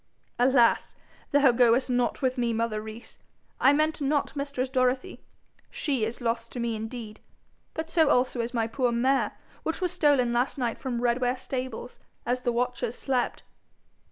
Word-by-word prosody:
'Alas! 245 Hz, -1 st, +3 dB, 0.3 s
thou 285 Hz, -3 st, +5 dB
goest 240 Hz, +1 st, +4 dB
not 245 Hz, +1 st, 0 dB
with 255 Hz, -1 st, +2 dB
me, 240 Hz, -2 st, 0 dB
mother 225 Hz, -1 st, -1 dB
Rees. 220 Hz, +2 st, -10 dB, 0.4 s
I 270 Hz, -, +6 dB
meant 310 Hz, +1 st, +1 dB
not 285 Hz, +1 st, 0 dB
mistress 280 Hz, -2 st, -2 dB
Dorothy. 255 Hz, 0 st, 0 dB, 0.5 s
She 270 Hz, -8 st, -1 dB
is 225 Hz, +2 st, -5 dB
lost 230 Hz, 0 st, -2 dB
to 245 Hz, -, -5 dB
me 235 Hz, -1 st, -1 dB
indeed; 220 Hz, 0 st, -7 dB, 0.6 s
but 320 Hz, +1 st, -4 dB
so 320 Hz, -3 st, +4 dB
also 250 Hz, -2 st, +2 dB
is 230 Hz, +1 st, -3 dB
my 230 Hz, -3 st, 0 dB
poor 245 Hz, +2 st, 0 dB
mare, 260 Hz, +3 st, +1 dB, 0.3 s
which 320 Hz, -, -3 dB
was 365 Hz, -2 st, 0 dB
stolen 270 Hz, -6 st, +3 dB
last 245 Hz, +4 st, 0 dB
night 240 Hz, -3 st, -2 dB
from 245 Hz, -3 st, -3 dB
Redware 245 Hz, +1 st, +1 dB
stables 255 Hz, -2 st, -5 dB, 0.3 s
as 250 Hz, +1 st, 0 dB
the 245 Hz, -, 0 dB
watchers 245 Hz, 0 st, -1 dB
slept.' 255 Hz, -3 st, -1 dB
250 Hz, 160 wpm, -27 LUFS, 235-270 Hz, 0.6 s, I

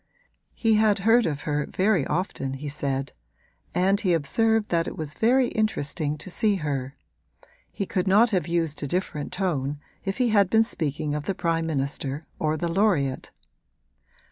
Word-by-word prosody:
He 225 Hz, -2 st, +2 dB
had 215 Hz, -1 st, +4 dB
heard 230 Hz, -1 st, +5 dB
of 145 Hz, -2 st, -3 dB
her 150 Hz, -1 st, -1 dB
very 185 Hz, -6 st, +1 dB
often, 150 Hz, -5 st, -2 dB
he 145 Hz, +2 st, -6 dB
said; 140 Hz, -1 st, -3 dB, 0.6 s
and 190 Hz, +3 st, +3 dB
he 185 Hz, -4 st, +2 dB
observed 220 Hz, +8 st, +1 dB
that 165 Hz, -1 st, +1 dB
it -, -, -6 dB
was 155 Hz, -2 st, -3 dB
very 245 Hz, +5 st, +3 dB
interesting 155 Hz, -8 st, -1 dB
to 155 Hz, -, -8 dB
see 210 Hz, +2 st, +2 dB
her: 140 Hz, -5 st, -3 dB, 0.8 s
he 200 Hz, -, -3 dB
could 185 Hz, 0 st, -1 dB
not 215 Hz, +5 st, +5 dB
have 185 Hz, -4 st, 0 dB
used 165 Hz, -3 st, -1 dB
a 145 Hz, -, -2 dB
different 160 Hz, -2 st, -3 dB
tone 150 Hz, -7 st, -2 dB, 0.2 s
if 195 Hz, -1 st, -3 dB
he 250 Hz, -2 st, +2 dB
had 200 Hz, -3 st, +4 dB
been 220 Hz, +2 st, +5 dB
speaking 150 Hz, -8 st, -2 dB
of 150 Hz, -1 st, -3 dB
the 195 Hz, -, -1 dB
prime 165 Hz, -2 st, 0 dB
minister 140 Hz, 0 st, -2 dB
or 155 Hz, 0 st, 0 dB
the 170 Hz, -, -2 dB
laureate. 165 Hz, -8 st, +1 dB
170 Hz, 170 wpm, -25 LUFS, 145-205 Hz, 0.8 s, heard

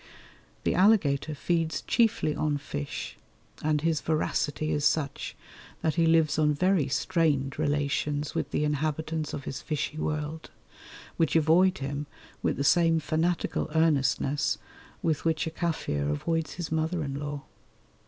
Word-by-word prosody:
The -, -, +1 dB
alligator 160 Hz, -7 st, +3 dB
feeds 165 Hz, +1 st, -1 dB
chiefly 225 Hz, -10 st, +2 dB
on 150 Hz, -2 st, 0 dB
fish, 115 Hz, -, -5 dB, 0.5 s
and 150 Hz, -1 st, +1 dB
his 160 Hz, -2 st, +1 dB
voracity 155 Hz, -1 st, 0 dB
is 145 Hz, -, 0 dB
such 145 Hz, -2 st, 0 dB, 0.5 s
that 160 Hz, -, +2 dB
he 165 Hz, -1 st, +2 dB
lives 160 Hz, -2 st, +3 dB
on 150 Hz, -1 st, +3 dB
very 180 Hz, -2 st, +2 dB
strained 145 Hz, -3 st, 0 dB
relations 145 Hz, 0 st, 0 dB
with -, -, -2 dB
the -, -, 0 dB
inhabitants 155 Hz, +1 st, -1 dB
of 140 Hz, -, -5 dB
his 135 Hz, -, -5 dB
fishy 155 Hz, 0 st, -3 dB
world, 155 Hz, +1 st, -3 dB, 0.7 s
which 165 Hz, -2 st, +1 dB
avoid 170 Hz, +4 st, +4 dB
him 140 Hz, +2 st, -4 dB, 0.3 s
with -, -, 0 dB
the 140 Hz, -, 0 dB
same 165 Hz, +2 st, +4 dB
fanatical 160 Hz, +3 st, -1 dB
earnestness 145 Hz, -2 st, +2 dB, 0.5 s
with 160 Hz, -4 st, 0 dB
which 160 Hz, -1 st, +1 dB
a 160 Hz, -, -3 dB
Kaffir 155 Hz, -, -1 dB
avoids 160 Hz, -, -1 dB
his 175 Hz, -3 st, -5 dB
mother 160 Hz, +1 st, 0 dB
in 140 Hz, -1 st, -4 dB
law. 145 Hz, -1 st, -5 dB
155 Hz, 140 wpm, -28 LUFS, 145-165 Hz, 0.7 s, avoid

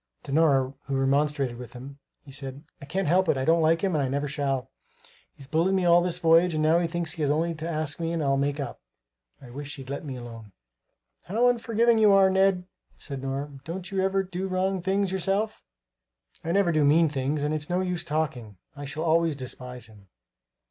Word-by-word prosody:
To -, -, -8 dB
Nora 140 Hz, -4 st, +3 dB
who 135 Hz, -, -3 dB
remonstrated 135 Hz, -1 st, +1 dB
with 125 Hz, -, -9 dB
him 135 Hz, +3 st, -10 dB, 0.2 s
he 140 Hz, -, -13 dB
said: 135 Hz, 0 st, -7 dB, 0.2 s
"I -, -, -8 dB
can't 185 Hz, +6 st, -2 dB
help 180 Hz, +2 st, +3 dB
it; -, -, +3 dB
I 130 Hz, -, -1 dB
don't 165 Hz, +1 st, +4 dB
like 165 Hz, +2 st, +2 dB
him 190 Hz, -2 st, +1 dB
and 150 Hz, -3 st, +1 dB
I -, -, 0 dB
never 140 Hz, +3 st, -1 dB
shall. 140 Hz, -3 st, -2 dB, 0.6 s
He's 140 Hz, -, -11 dB
bullied 165 Hz, +7 st, +1 dB
me 185 Hz, -2 st, +1 dB
all 175 Hz, 0 st, +6 dB
the 180 Hz, -, 0 dB
voyage 170 Hz, 0 st, +3 dB
and 155 Hz, -, 0 dB
now 160 Hz, +2 st, +4 dB
he 175 Hz, -, 0 dB
thinks 170 Hz, -1 st, -2 dB
he 160 Hz, -, -3 dB
has 145 Hz, -, +1 dB
only 165 Hz, +3 st, +1 dB
to 160 Hz, +1 st, -5 dB
ask 155 Hz, -2 st, -3 dB
me 165 Hz, 0 st, -2 dB
and 165 Hz, -2 st, -1 dB
I'll 135 Hz, -1 st, +2 dB
make 140 Hz, +1 st, -1 dB
up. 140 Hz, -, -5 dB, 0.6 s
I 125 Hz, -3 st, -13 dB
wish 145 Hz, +3 st, -6 dB
he'd 135 Hz, -1 st, -9 dB
let 140 Hz, -, -4 dB
me 135 Hz, -4 st, -6 dB
alone!" 115 Hz, -4 st, -10 dB, 0.7 s
"How 230 Hz, +6 st, +2 dB
unforgiving 235 Hz, -1 st, +2 dB
you 215 Hz, -2 st, +6 dB
are, 195 Hz, -1 st, +5 dB
Ned," 190 Hz, -1 st, +3 dB, 0.3 s
said 140 Hz, -3 st, -7 dB
Nora, 135 Hz, +2 st, -4 dB
"don't 180 Hz, +4 st, -6 dB
you 195 Hz, -1 st, 0 dB
ever 195 Hz, 0 st, +1 dB
do 185 Hz, 0 st, -4 dB
wrong 190 Hz, 0 st, -1 dB
things 195 Hz, +1 st, 0 dB
yourself?" 195 Hz, +3 st, -1 dB, 0.8 s
"I 165 Hz, -, -2 dB
never 195 Hz, -1 st, +3 dB
do 155 Hz, -2 st, +2 dB
mean 160 Hz, +3 st, +5 dB
things. 145 Hz, +1 st, -2 dB
And 150 Hz, +1 st, 0 dB
it's 150 Hz, -1 st, -3 dB
no 180 Hz, +1 st, +1 dB
use 180 Hz, -2 st, -2 dB
talking; 130 Hz, -10 st, -3 dB, 0.2 s
I 145 Hz, 0 st, -7 dB
shall 150 Hz, +3 st, -4 dB
always 165 Hz, -1 st, +2 dB
despise 125 Hz, -2 st, -7 dB
him." 105 Hz, -3 st, -17 dB
155 Hz, 215 wpm, -26 LUFS, 140-180 Hz, 0.8 s, all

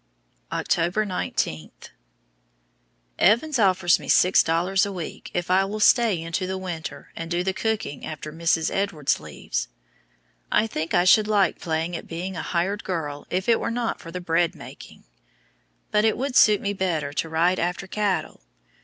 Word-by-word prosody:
October 175 Hz, +5 st, 0 dB
19. 80 Hz, -, -2 dB, 1.5 s
Evans 250 Hz, -, +3 dB
offers 185 Hz, -3 st, +4 dB
me -, -, -9 dB
six 185 Hz, +1 st, +5 dB
dollars 180 Hz, +4 st, +1 dB
a 200 Hz, -, -1 dB
week 180 Hz, -4 st, -7 dB
if 175 Hz, 0 st, -1 dB
I 190 Hz, +1 st, +4 dB
will 205 Hz, +2 st, -4 dB
stay 215 Hz, -3 st, +4 dB
into 165 Hz, +3 st, -3 dB
the 190 Hz, 0 st, -3 dB
winter 175 Hz, -4 st, -6 dB
and 165 Hz, 0 st, -6 dB
do 175 Hz, +1 st, 0 dB
the 190 Hz, +1 st, -1 dB
cooking 220 Hz, -9 st, -3 dB
after 155 Hz, 0 st, -7 dB
Mrs. 165 Hz, 0 st, +1 dB
Edwards 185 Hz, -8 st, 0 dB
leaves! -, -, -4 dB, 0.8 s
I 215 Hz, -, +3 dB
think 165 Hz, -7 st, -3 dB
I 175 Hz, -, +4 dB
should 210 Hz, +3 st, +5 dB
like 205 Hz, -4 st, +2 dB
playing 165 Hz, +1 st, -2 dB
at -, -, -7 dB
being 180 Hz, +3 st, -5 dB
a -, -, -3 dB
"hired 185 Hz, +4 st, -1 dB
girl" 150 Hz, -6 st, -4 dB
if 185 Hz, +1 st, -2 dB
it 230 Hz, -1 st, +4 dB
were -, -, -2 dB
not 235 Hz, 0 st, -2 dB
for 165 Hz, -, -10 dB
the 180 Hz, +2 st, -5 dB
bread 170 Hz, -1 st, +1 dB
making! -, -, -12 dB, 0.9 s
But 210 Hz, -, +3 dB
it 220 Hz, -, +2 dB
would 265 Hz, 0 st, -3 dB
suit 210 Hz, -2 st, +6 dB
me 200 Hz, 0 st, -1 dB
better 165 Hz, -7 st, -2 dB
to 160 Hz, -, -2 dB
ride 170 Hz, +3 st, +2 dB
after 180 Hz, +2 st, -2 dB
cattle. 205 Hz, 0 st, -2 dB
180 Hz, 170 wpm, -24 LUFS, 165-205 Hz, 1.5 s, suit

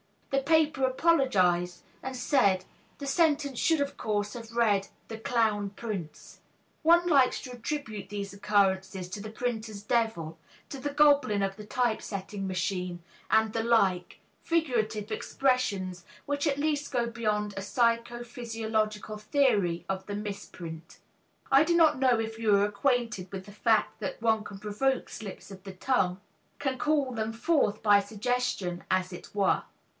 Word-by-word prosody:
The 275 Hz, -, +3 dB
paper 305 Hz, -2 st, +3 dB
apologized 200 Hz, -, +2 dB, 0.2 s
and 265 Hz, 0 st, -5 dB
said, 220 Hz, -8 st, +2 dB, 0.3 s
"The 285 Hz, -, -6 dB
sentence 285 Hz, -2 st, +1 dB
should, 325 Hz, -3 st, +3 dB
of 280 Hz, -, -2 dB
course, 205 Hz, -2 st, -1 dB
have 230 Hz, -1 st, -9 dB
read 205 Hz, -4 st, +2 dB, 0.2 s
'The 225 Hz, -1 st, -6 dB
Clown 220 Hz, -4 st, +1 dB
Prince.'" 195 Hz, -8 st, -7 dB, 0.4 s
One 340 Hz, +2 st, +5 dB
likes 275 Hz, -7 st, +4 dB
to 255 Hz, -, -8 dB
attribute 240 Hz, -5 st, -5 dB
these 200 Hz, -1 st, -5 dB
occurrences 195 Hz, -2 st, +1 dB
to 200 Hz, +2 st, -6 dB
the 215 Hz, -, -6 dB
printer's 220 Hz, -3 st, -4 dB
devil, 210 Hz, -8 st, -1 dB, 0.3 s
to 275 Hz, -, -6 dB
the 290 Hz, -, -2 dB
goblin 285 Hz, -8 st, +4 dB
of 195 Hz, 0 st, -1 dB
the 210 Hz, -, -9 dB
typesetting 210 Hz, -4 st, -2 dB
machine, 180 Hz, -2 st, -2 dB, 0.3 s
and 220 Hz, 0 st, +3 dB
the 225 Hz, -, 0 dB
like 200 Hz, -6 st, +1 dB, 0.2 s
figurative 225 Hz, -10 st, 0 dB
expressions 205 Hz, -8 st, -1 dB, 0.2 s
which 285 Hz, +2 st, -1 dB
at 280 Hz, -2 st, +1 dB
least 295 Hz, -1 st, -1 dB
go 240 Hz, -3 st, +1 dB
beyond 210 Hz, -3 st, -1 dB
a 195 Hz, -, -4 dB
psycho 235 Hz, +2 st, 0 dB
physiological 220 Hz, -3 st, -3 dB
theory 210 Hz, -7 st, +1 dB
of 190 Hz, 0 st, -3 dB
the 205 Hz, -, -3 dB
misprint. 175 Hz, -5 st, -7 dB, 0.5 s
I 275 Hz, +2 st, +7 dB
do 340 Hz, +2 st, +1 dB
not 320 Hz, -5 st, +5 dB
know 255 Hz, -3 st, +4 dB
if 225 Hz, 0 st, -4 dB
you 215 Hz, -3 st, +4 dB
are 200 Hz, 0 st, +4 dB
acquainted 215 Hz, -3 st, -1 dB
with 190 Hz, -1 st, -6 dB
the 205 Hz, -, -11 dB
fact 215 Hz, +1 st, +1 dB
that 200 Hz, -, -4 dB
one 220 Hz, -2 st, +2 dB
can 200 Hz, -, -8 dB
provoke 220 Hz, +6 st, -1 dB
slips 205 Hz, -2 st, -8 dB
of 190 Hz, -1 st, -11 dB
the 195 Hz, -2 st, -8 dB
tongue, 185 Hz, -3 st, 0 dB, 0.4 s
can 270 Hz, -2 st, -2 dB
call 295 Hz, -4 st, +1 dB
them 225 Hz, -2 st, -3 dB
forth 230 Hz, -4 st, +1 dB
by 205 Hz, -2 st, +6 dB
suggestion, 205 Hz, -4 st, -2 dB
as 185 Hz, 0 st, 0 dB
it 180 Hz, -, -11 dB
were. 200 Hz, -2 st, +2 dB
220 Hz, 155 wpm, -29 LUFS, 200-260 Hz, 0.5 s, I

